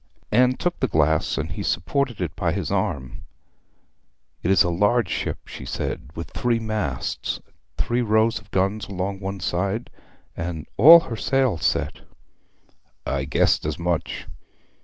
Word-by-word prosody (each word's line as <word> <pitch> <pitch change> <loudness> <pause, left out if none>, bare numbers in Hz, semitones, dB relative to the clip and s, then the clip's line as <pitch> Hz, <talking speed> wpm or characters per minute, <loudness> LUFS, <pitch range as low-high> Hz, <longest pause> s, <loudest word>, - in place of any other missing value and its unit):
Anne 125 +3 +4
took 175 +5 -2
the 130 - +1
glass, 80 -5 +2
and - - -3
he - - -5
supported 130 -7 -1
it 85 -4 -3
by - - 0
his - - -3
arm. 65 -3 -2 1.2
'It 85 - -1
is 95 - +6
a 85 - 0
large 105 +3 +2
ship,' - - -3
she - - -8
said, - - -4
'with 85 - -6
three 120 -1 +1
masts, 110 - -3 0.4
three 120 +1 0
rows 110 0 +2
of 105 -1 -21
guns 100 +3 0
along 95 0 -3
the 95 -2 -5
side, 100 +6 -1 0.4
and 85 -3 -4
all 165 +9 +10
her 115 - -5
sails 120 - +1
set.' - - 0 1.1
'I 70 -1 -1
guessed 70 - +2
as 75 0 -2
much.' 85 -1 -2
100 Hz, 150 wpm, -23 LUFS, 85-120 Hz, 1.2 s, all